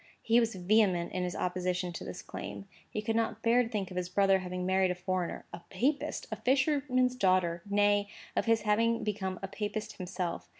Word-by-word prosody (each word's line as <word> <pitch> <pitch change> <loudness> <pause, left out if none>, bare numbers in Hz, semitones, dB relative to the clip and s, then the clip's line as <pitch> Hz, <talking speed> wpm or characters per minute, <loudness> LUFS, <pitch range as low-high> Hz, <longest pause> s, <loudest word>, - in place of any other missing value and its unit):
He 230 +1 +5
was 230 -2 0
vehement 185 -2 +2
in 185 - -2
his 180 0 -2
opposition 180 0 -1
to - - -6
this 90 - -7
claim. 100 -1 -7 0.2
He 210 - -4
could 225 +1 -1
not 225 -1 -1
bear 235 +2 +5
to 230 - -2
think 200 -5 -3
of 180 - -6
his 180 -1 -2
brother 195 +1 +4
having 180 0 -4
married 190 0 +3
a 180 - -1
foreigner—a 180 -1 -3
papist, 265 +10 -1
a - - -2
fisherman's 265 -2 +2
daughter; 185 -6 +2
nay, 205 0 +3 0.3
of - - +1
his 230 -1 +3
having 230 +2 +2
become 190 -3 -2
a - - -1
papist 215 +1 -4
himself. 180 -2 -4
195 Hz, 195 wpm, -31 LUFS, 180-225 Hz, 0.3 s, He